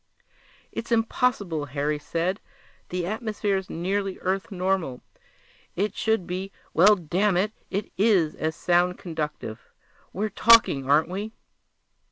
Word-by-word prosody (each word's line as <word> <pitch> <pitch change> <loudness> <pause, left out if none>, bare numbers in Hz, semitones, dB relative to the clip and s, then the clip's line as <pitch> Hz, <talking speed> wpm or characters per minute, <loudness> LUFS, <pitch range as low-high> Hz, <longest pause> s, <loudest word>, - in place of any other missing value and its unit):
"It's 230 - -6
impossible," 225 - +1
Harry 145 +2 -2
said. 170 +6 -2 0.5
"The 180 -1 -2
atmosphere's 205 -2 -2
nearly 195 +3 -2
Earth 190 +2 -1
normal. 185 -8 -1 0.7
It 205 +4 -1
should 220 -5 0
be 185 +3 -4 0.2
well, 200 +6 +7
damn 185 +2 +1
it, 205 +4 +1 0.2
it 200 +2 -3
is 195 -8 +3
as 160 0 -2
sound 180 +1 +2
conductive; 150 -9 -5 0.4
we're 210 +3 -2
talking, 210 - +5
aren't 150 +4 +4
we?" 205 +4 -4
185 Hz, 120 wpm, -25 LUFS, 165-205 Hz, 0.7 s, well